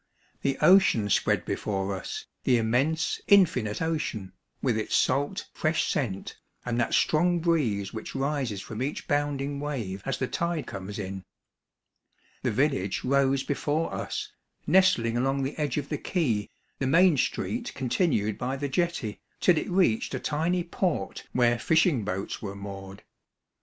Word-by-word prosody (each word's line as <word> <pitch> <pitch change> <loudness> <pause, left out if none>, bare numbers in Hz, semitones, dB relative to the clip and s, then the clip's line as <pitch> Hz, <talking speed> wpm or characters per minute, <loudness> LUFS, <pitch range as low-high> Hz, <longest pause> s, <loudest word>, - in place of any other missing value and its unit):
The 135 -1 0
ocean 180 - +5
spread - - +2
be - - -1
fore 100 -1 -2
us, 95 - -6 0.2
the 125 - +4
immense, 130 +8 +1
infinite 155 - +4
ocean, 120 - -2 0.3
with 125 -4 +1
its 110 -1 -1
salt, 145 +9 +1
fresh 155 -2 0
scent, 100 -9 -3 0.3
and 120 -1 -1
that 120 - +1
strong 175 +3 +3
breeze 125 - 0
which 110 -1 -7
rises 135 -7 -1
from 110 +1 -6
each 140 +3 -3
bounding 145 -1 -1
wave 120 -10 -4
as 135 - -2
the 130 - -1
tide 170 -3 -2
comes 95 0 -6
in. 95 -2 -5 1.2
The - - 0
village 120 -6 0
rose 135 0 +2
before 145 +3 -1
us, - - -4 0.3
nestling 155 -10 +4
along 135 +2 +1
the 135 - -3
edge 150 -1 -1
of 140 -2 -3
the 150 - -2
quay, 120 - 0 0.3
the 135 - 0
main 170 +4 +5
street 235 - -1
continued 125 - 0
by 130 +2 -2
the 140 +1 -3
jetty, 165 -8 -1 0.2
till 180 - +5
it 155 - -2
reached 175 - +2
a - - -2
tiny 170 +4 0
port 170 - -2
where 120 -1 +3
fishing 160 - +3
boats 95 -1 -4
were 100 -2 -5
moored. 100 -1 -8
135 Hz, 150 wpm, -27 LUFS, 110-160 Hz, 1.2 s, ocean